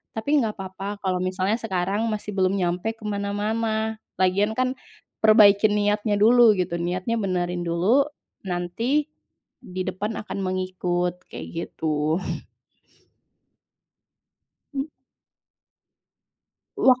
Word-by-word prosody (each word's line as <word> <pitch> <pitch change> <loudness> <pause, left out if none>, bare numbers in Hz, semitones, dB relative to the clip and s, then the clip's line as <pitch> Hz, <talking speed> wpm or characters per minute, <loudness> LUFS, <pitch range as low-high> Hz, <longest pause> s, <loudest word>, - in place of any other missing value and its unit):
Tapi, 285 +7 +2
enggak 220 -4 -1
apa-apa, 195 +2 -6
kalau 185 -1 0
misalnya 185 +4 0
sekarang 200 +1 -1
masih 210 -1 -3
belum 190 0 +1
nyampe 180 +4 -1
ke 225 - -17
mana-mana. 215 +2 -1 0.2
Lagian, 200 +4 +2
kan, 255 +1 0 0.4
perbaikin 210 -1 +6
niatnya 210 0 +1
dulu, 225 +1 +6
gitu. 175 -2 -1
Niatnya 185 +7 -1
benerin 180 -3 -1
dulu, 210 - +3 0.4
nanti, 225 - -1 0.5
di 185 0 -4
depan 205 +4 -2
akan 210 - -6
mengikut, 180 -1 -2
kayak - - -8 0.3
gitu. 155 +2 0 2.5
Mmm. 275 +3 -2 1.9
Wak 255 -1 +5
200 Hz, 100 wpm, -24 LUFS, 185-220 Hz, 2.5 s, perbaikin